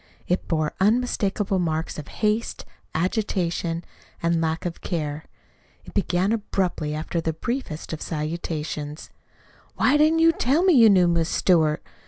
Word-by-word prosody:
It 180 Hz, -, -1 dB
bore 155 Hz, -2 st, 0 dB
unmistakable 205 Hz, -2 st, +1 dB
marks 160 Hz, -2 st, -2 dB
of 150 Hz, -, -8 dB
haste, 215 Hz, +1 st, -1 dB, 0.3 s
agitation, 175 Hz, -2 st, -1 dB, 0.4 s
and 170 Hz, 0 st, +2 dB
lack 160 Hz, +1 st, -1 dB
of 170 Hz, -1 st, -4 dB
care. 155 Hz, -4 st, -3 dB, 0.6 s
It -, -, -12 dB
began 190 Hz, 0 st, +1 dB
abruptly, 185 Hz, -8 st, -1 dB
after 160 Hz, +2 st, -2 dB
the 160 Hz, 0 st, -1 dB
briefest 165 Hz, -, -4 dB
of 155 Hz, -, -5 dB
salutations: 155 Hz, -1 st, -4 dB, 0.6 s
Why 285 Hz, +3 st, +3 dB
didn't 310 Hz, +2 st, +4 dB
you 330 Hz, 0 st, +6 dB
tell 300 Hz, +2 st, +1 dB
me 375 Hz, -2 st, +5 dB
you 230 Hz, -6 st, +7 dB
knew 185 Hz, -3 st, +5 dB
Miss 170 Hz, -1 st, +1 dB
Stewart? 160 Hz, -4 st, +2 dB
175 Hz, 140 wpm, -24 LUFS, 160-210 Hz, 0.6 s, you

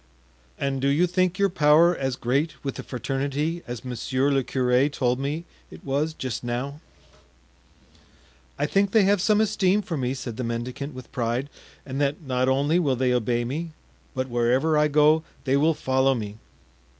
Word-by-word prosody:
"And 135 Hz, -1 st, -2 dB
do 135 Hz, -, +1 dB
you 145 Hz, +6 st, +3 dB
think 180 Hz, 0 st, 0 dB
your 200 Hz, -, +3 dB
power 160 Hz, +3 st, +5 dB
as 135 Hz, -4 st, -2 dB
great 140 Hz, +7 st, 0 dB
with 135 Hz, -2 st, -2 dB
the -, -, -6 dB
fraternity 140 Hz, +6 st, -2 dB
as 120 Hz, 0 st, -6 dB
monsieur 130 Hz, +3 st, -1 dB
le 135 Hz, -1 st, +2 dB
curé 130 Hz, +3 st, +2 dB
told 125 Hz, -2 st, 0 dB
me 150 Hz, +5 st, -3 dB, 0.2 s
it -, -, -13 dB
was 145 Hz, +3 st, -1 dB
just 130 Hz, -3 st, -4 dB
now?" 130 Hz, +5 st, -4 dB, 1.8 s
"I 145 Hz, -, 0 dB
think 195 Hz, +6 st, +2 dB
they 220 Hz, -3 st, +6 dB
have 200 Hz, -1 st, +3 dB
some 210 Hz, +2 st, +3 dB
esteem 210 Hz, -2 st, +2 dB
for 170 Hz, -4 st, -4 dB
me," 130 Hz, 0 st, -1 dB
said 120 Hz, -4 st, -6 dB
the 125 Hz, -, -3 dB
mendicant 125 Hz, +4 st, -4 dB
with 130 Hz, -, -10 dB
pride, 125 Hz, +2 st, -2 dB, 0.4 s
"and 135 Hz, +1 st, -4 dB
that 145 Hz, +1 st, 0 dB
not 130 Hz, -1 st, 0 dB
only 145 Hz, +6 st, +2 dB
will 140 Hz, -7 st, +1 dB
they 125 Hz, 0 st, +1 dB
obey 120 Hz, 0 st, 0 dB
me, 155 Hz, +6 st, -4 dB, 0.4 s
but 130 Hz, 0 st, -1 dB
wherever 125 Hz, +6 st, +2 dB
I 150 Hz, 0 st, +4 dB
go 150 Hz, +2 st, +4 dB, 0.2 s
they 135 Hz, -1 st, +1 dB
will 155 Hz, +3 st, +3 dB
follow 130 Hz, 0 st, +2 dB
me." 105 Hz, -2 st, -6 dB
140 Hz, 175 wpm, -25 LUFS, 125-155 Hz, 1.8 s, they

